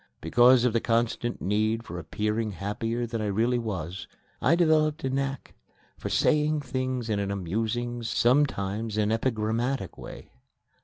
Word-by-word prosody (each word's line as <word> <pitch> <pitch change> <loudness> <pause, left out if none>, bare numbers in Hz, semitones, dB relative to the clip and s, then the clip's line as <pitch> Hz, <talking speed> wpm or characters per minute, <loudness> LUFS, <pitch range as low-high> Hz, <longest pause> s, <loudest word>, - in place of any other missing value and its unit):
Because 120 +8 +5
of 120 - +2
the 115 - +3
constant 120 +1 0
need 110 +3 +1
for 90 -5 -7
appearing 105 +6 -2
happier 115 +6 -2
than 115 -1 -4
I 105 - -1
really 115 +5 +1
was, 95 -5 -5 0.3
I 145 +8 +4
developed 155 -3 +2
a 135 - -1
knack 135 +1 -3 0.4
for - - -6
saying 150 0 +2
things 130 -2 -3
in 105 -2 0
an 100 -1 -2
amusing, 110 +6 -2
sometimes 115 -4 +1
an 105 0 +2
epigrammatic, 115 0 -1
way. - - -10
115 Hz, 145 wpm, -27 LUFS, 105-130 Hz, 0.4 s, Because